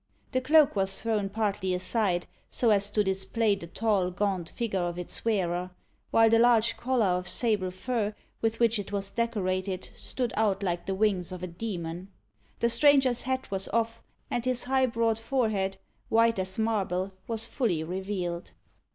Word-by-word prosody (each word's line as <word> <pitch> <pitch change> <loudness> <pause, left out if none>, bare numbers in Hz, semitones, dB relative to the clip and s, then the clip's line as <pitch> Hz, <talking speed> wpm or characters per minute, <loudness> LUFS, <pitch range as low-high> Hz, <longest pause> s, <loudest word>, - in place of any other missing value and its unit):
The 255 - +1
cloak 300 +1 +5
was 195 -1 0
thrown 215 -3 -1
partly 200 -3 -1
aside, 185 -1 +1 0.2
so 235 -3 +2
as 200 -1 +3
to 210 - +1
display 200 +3 +1
the 190 -4 -6
tall, 200 -1 +1
gaunt 185 -2 -2
figure 225 -5 -2
of 175 -1 -2
its 180 - -3
wearer; 180 -5 0 0.4
while 225 0 +5
the 225 0 +4
large 235 -1 +4
collar 250 -3 +1
of 180 -1 0
sable 210 -5 +1
fur 210 +2 -2 0.3
with 225 0 0
which 230 -2 +3
it 205 - -6
was 200 -1 -3
decorated 190 -5 -2
stood 245 -3 -4
out 205 -2 +1
like 175 -2 -2
the 195 - -1
wings 190 -3 +1
of 185 -1 -7
a - - -2
demon. 175 -2 -5 0.5
The 235 - +3
stranger's 260 0 +4
hat 260 -2 -3
was 195 0 -1
off, 230 0 -1 0.3
and 240 - -1
his 255 -1 +1
high 260 +1 +2
broad 230 -1 0
forehead, 220 -6 0 0.3
white 230 -1 +3
as 190 0 -1
marble, 195 -4 -1
was 225 -1 0
fully 210 - -1
revealed. 180 0 -4
205 Hz, 170 wpm, -28 LUFS, 185-230 Hz, 0.5 s, cloak